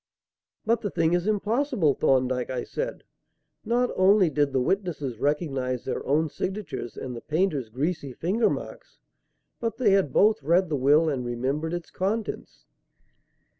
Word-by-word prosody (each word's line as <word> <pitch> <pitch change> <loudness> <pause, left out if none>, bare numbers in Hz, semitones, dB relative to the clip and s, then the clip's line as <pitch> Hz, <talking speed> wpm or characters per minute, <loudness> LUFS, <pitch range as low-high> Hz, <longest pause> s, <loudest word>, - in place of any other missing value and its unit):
"But 230 +1 +2
the 205 - -2
thing 165 -2 +1
is 175 +2 +1
impossible, 215 - +1
Thorndyke," 130 -2 +1
I 125 -1 -2
said. - - -5 0.6
"Not 240 +2 +1
only 185 -2 +4
did 145 -1 +1
the 135 - +1
witnesses 150 - -2
recognize 135 -4 -1
their 130 - -3
own 155 +3 +2
signatures 190 - -5
and 125 -2 -5
the 115 - -7
painter's 155 - -1
greasy 145 +4 -2
finger 190 - +1
marks, - - -7 0.6
but 230 -1 -3
they 230 -6 +3
had 195 -8 +3
both 210 -4 +4
read 170 +5 +2
the 150 - 0
will 145 +4 +4
and 135 -5 -1
remembered 135 +7 -2
its 175 -1 -7
contents." 205 +3 -3
160 Hz, 150 wpm, -26 LUFS, 135-195 Hz, 0.6 s, only